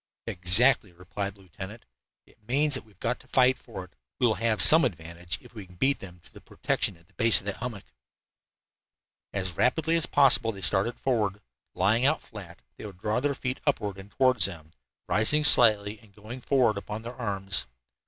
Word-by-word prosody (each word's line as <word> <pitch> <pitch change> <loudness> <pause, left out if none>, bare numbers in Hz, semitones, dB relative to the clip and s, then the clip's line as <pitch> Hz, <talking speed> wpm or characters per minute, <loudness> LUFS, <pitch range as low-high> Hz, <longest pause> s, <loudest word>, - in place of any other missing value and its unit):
"Exactly," 95 +5 +2
replied 95 +3 -6
the 100 - -19
lieutenant. 95 +4 -10 0.4
"It - - -26
means 145 +4 +2
that 130 - +2
we 110 - -23
have 95 - -34
got 125 +2 -2
to - - -20
fight 130 0 +3
for 105 -6 -9
it. 90 0 -17 0.3
We 125 - +2
will 115 - +3
have 110 +1 -1
some 160 +1 +7
advantage 85 -4 -4
if - - -17
we 105 -5 -10
can 90 - -18
beat 135 +9 +1
them 90 -2 -12
to - - -18
the - - -14
protection 90 - -2
of 85 - -25
the - - -32
base 115 -1 +5
of - - -11
that 100 - -4
hummock." 115 -4 -7 1.5
As 95 -2 -2
rapidly 160 - 0
as 165 +1 0
possible 125 -5 +4
they 100 -3 -11
started 100 +5 +1
forward. 105 -6 -1 0.4
Lying 115 +5 +2
out 145 +4 +1
flat, 95 -6 -12
they - - -9
would 95 -3 -13
draw 105 +5 -1
their 140 +1 -1
feet 130 0 -4
upward 105 -8 -1
and 95 +1 -12
toward 130 +2 +1
them, 85 -5 -1 0.3
rising 110 +12 +1
slightly 105 -6 +4
and 105 -2 -23
going 110 +5 -10
forward 125 -6 +1
upon 105 +2 -7
their 120 +1 -8
arms. 100 - 0
110 Hz, 200 wpm, -27 LUFS, 95-125 Hz, 1.5 s, some